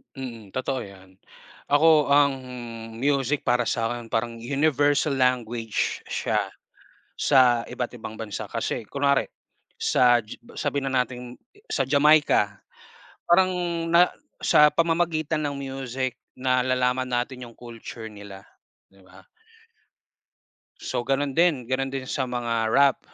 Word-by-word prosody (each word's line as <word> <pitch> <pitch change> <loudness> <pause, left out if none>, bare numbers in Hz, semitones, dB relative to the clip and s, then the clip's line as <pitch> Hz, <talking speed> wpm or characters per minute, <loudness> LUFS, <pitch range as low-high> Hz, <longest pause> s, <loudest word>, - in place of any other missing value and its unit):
Mm, 120 -5 -8
totoo 130 +1 -1
yan. 95 -3 -12 0.5
Ako 150 +1 +5
ang 140 0 +4 0.6
music 140 +2 0
para 120 -1 +1
sa'kin 115 0 -2
parang, 115 +1 -2
universal 145 +3 +1
language 120 -4 0
siya - - -1 0.8
sa 125 -4 +4
iba't 125 0 -5
ibang 110 -2 -9
bansa, 105 -4 -5
kasi - - -2
kunwari 140 0 +2 0.6
sa 120 -1 +4
Ji 110 -2 -9 0.2
sabihin 140 -2 -1
na 130 -1 +3
natin, 125 0 -10 0.3
sa - - +1
Jamaica 145 -9 +4 0.7
parang 185 +2 +5 0.4
na 170 +2 +5 0.3
sa 150 - +6
pamamagitan 165 -2 0
ng 140 - -4
music 135 -2 -4 0.2
nalalaman 130 0 +1
natin 125 0 -3
yung 115 - -16
culture 115 -2 -9
nila. 100 -2 -11 0.5
Di 95 - -23
ba? 95 0 -18 1.5
So, 120 - -4
ganun 135 +1 0
din, 160 -3 +2
gano'n 135 +1 0
din 135 -1 -4
sa 130 0 -2
mga 120 -2 -1
rap, 140 +4 +4
130 Hz, 120 wpm, -25 LUFS, 115-140 Hz, 1.5 s, sa